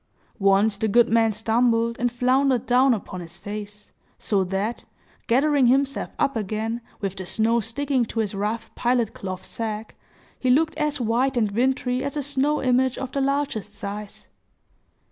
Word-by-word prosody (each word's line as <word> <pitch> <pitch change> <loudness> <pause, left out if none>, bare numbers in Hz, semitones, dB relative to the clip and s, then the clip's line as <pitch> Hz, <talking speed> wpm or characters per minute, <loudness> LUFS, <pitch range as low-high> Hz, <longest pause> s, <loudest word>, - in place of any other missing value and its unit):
Once, 200 +2 +3
the 220 - 0
good 235 +3 +4
man 225 -1 +3
stumbled, 230 +2 +1
and 245 0 +1
floundered 255 0 +2
down 255 +2 +4
upon 190 -5 -3
his 165 -1 -10
face, 210 0 -8 0.3
so 200 -3 0
that, 195 +5 -2 0.4
gathering 275 +2 +3
himself 275 +2 +1
up 275 - +1
again, 220 +2 -2 0.2
with 195 -2 -2
the 190 - -5
snow 225 +4 +2
sticking 255 +3 0
to 225 0 -4
his 215 -3 -1
rough 210 +3 -3
pilot 240 -2 0
cloth 185 -1 -6
sack, 220 -1 -5 0.5
he 255 - 0
looked 310 +5 +3
as 300 -1 0
white 245 +3 +1
and 215 -4 +1
wintry 250 +2 0
as 280 +2 -3
a 290 - -1
snow 285 +2 0
image 255 0 +2
of 265 -1 -5
the 275 - -1
largest 270 -7 -1
size. 205 0 -7
235 Hz, 165 wpm, -24 LUFS, 210-260 Hz, 0.5 s, good